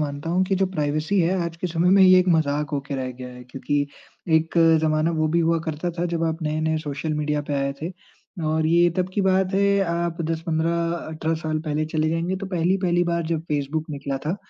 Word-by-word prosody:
मानता 145 +1 -3
हूँ 180 +2 +2
कि 195 - 0
जो 195 - +2
प्राइवेसी 155 +5 0
है 175 +3 +2
आज 170 0 -5
के 180 - -3
समय 170 +1 +1
में 195 0 +6
ये 185 0 +8
एक 185 0 +2
मज़ाक 150 -3 +1
हो 145 - -1
के 140 +1 -6
रह 130 -1 -3
गया 125 0 -9
है, 125 0 -11
क्योंकि 145 +3 -2 0.5
एक 160 +1 -1 0.3
ज़माना 155 +1 +2
वो 155 -1 +1
भी 170 +2 +2
हुआ 165 0 +2
करता 160 +2 -3
था 175 - 0
जब 165 -1 -1
आप 160 +1 -2
नए-नए 155 +1 0
सोशल 150 0 -3
मीडिया 150 0 -1
पे 145 - -1
आए 140 0 0
थे 165 +3 -3 0.6
और 155 0 +1
ये 170 +2 +4
तब 185 -1 0
की 205 - +1
बात 190 0 +2
है 200 0 +3
आप 170 0 -2
10-15, 165 +1 0 0.2
18 160 +1 -2
साल 155 -1 -2
पहले 150 +1 0
चले 155 0 +2
जाएँगे 170 +3 -1
तो 195 +1 -5
पहली-पहली 175 0 +1
बार 170 0 0
जब 160 -1 -1
फ़ेसबुक 150 +2 -2
निकला 140 -1 -4
था 170 +5 0
160 Hz, 225 wpm, -23 LUFS, 150-175 Hz, 0.6 s, ये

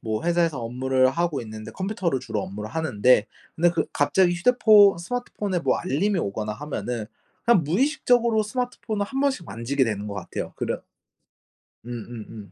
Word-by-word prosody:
뭐 110 +6 -3
회사에서 170 -6 +1
업무를 130 +2 +2
하고 170 +2 -1
있는데 110 -2 -8
컴퓨터를 185 - -2
주로 110 -3 -3
업무를 105 +2 -6
하는데 130 -7 +3 0.3
근데 170 +1 +4
그 165 -2 -1
갑자기 175 +4 +3
휴대폰 205 -2 +6
스마트폰에 205 -2 -3
뭐 - - +1
알림이 185 +4 0
오거나 105 -4 -2
하면은 125 -4 -4 0.4
그냥 235 -9 +4
무의식적으로 235 - +2
스마트폰을 220 -2 -3
1 270 +4 -3
번씩 265 - 0
만지게 120 +6 0
되는 105 -2 -3
것 100 - -5
같아요. 95 -4 -5
그런 - - -3 1.0
음음음. 115 -3 -8
160 Hz, 375 characters per minute, -24 LUFS, -, 1.0 s, 휴대폰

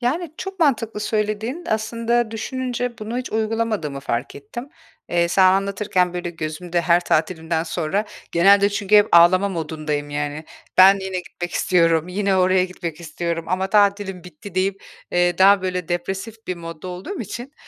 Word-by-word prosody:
Yani, 305 +6 -2
çok 385 -1 -7
mantıklı 230 -8 +1
söylediğin. 215 +8 -2
Aslında, 230 +1 0
düşününce 245 +1 -3
bunu 225 +3 -4
hiç 255 - -6
uygulamadığımı 220 -9 -1
fark 120 0 -3
ettim. 190 - -8 0.4
Eee, 170 0 +1
sana 190 +2 +5
anlatırken 195 -2 0
böyle 175 -1 -3
gözümde 170 +2 -3
her 170 0 +3
tatilimden 160 0 0
sonra 170 +4 -1 0.3
genelde 200 +4 +5
çünkü 205 0 +2
hep 205 0 +5
ağlama 180 +4 +6
modundayım, 155 -4 -3
yani. 145 +1 -3 0.3
"Ben 195 +1 +8
yine 190 -1 -3
gitmek 175 0 -7
istiyorum, 165 -2 +2
yine 195 +1 0
oraya 185 0 +3
gitmek 175 -3 -6
istiyorum 170 0 -4
ama 185 +1 0
tatilim 200 -3 +2
bitti" 180 +2 -11
deyip, 190 +1 -1 0.3
eee, 175 0 +2
daha 195 0 +6
böyle 180 -2 -3
depresif 195 +6 -4
bir 185 - -3
modda 165 +1 -8
olduğum 180 - -6
için, 240 +5 -7
185 Hz, 155 wpm, -21 LUFS, 170-215 Hz, 0.4 s, Ben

